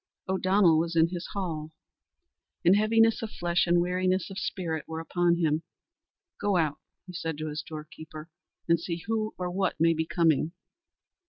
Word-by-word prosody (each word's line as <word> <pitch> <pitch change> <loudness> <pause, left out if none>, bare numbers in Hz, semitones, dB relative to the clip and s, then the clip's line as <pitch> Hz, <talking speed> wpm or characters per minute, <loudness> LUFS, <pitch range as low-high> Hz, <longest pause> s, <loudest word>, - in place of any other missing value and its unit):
O'Donnell 185 -3 +4
was 170 +1 -1
in 165 0 +4
his 175 -1 -5
hall, 165 -6 -3 1.0
and 180 +3 +7
heaviness 225 +2 +3
of 225 - -4
flesh 175 -2 0
and 175 0 +4
weariness 185 +1 0
of 195 - -5
spirit 165 -6 -3
were 160 0 -5
upon 175 +1 +1
him. 160 -2 +1 0.8
"Go 205 -2 +1
out," 155 -3 0 0.3
said 165 -2 -3
he 155 - -5
to 155 - -3
his 150 0 -4
doorkeeper, 155 0 -9 0.4
"and 170 -1 +4
see 170 0 -4
who 220 0 -1
or 180 -1 -3
what 190 -3 -1
may 165 +1 +4
be 160 0 -2
coming." 165 -2 +2
170 Hz, 165 wpm, -28 LUFS, 160-185 Hz, 1.0 s, and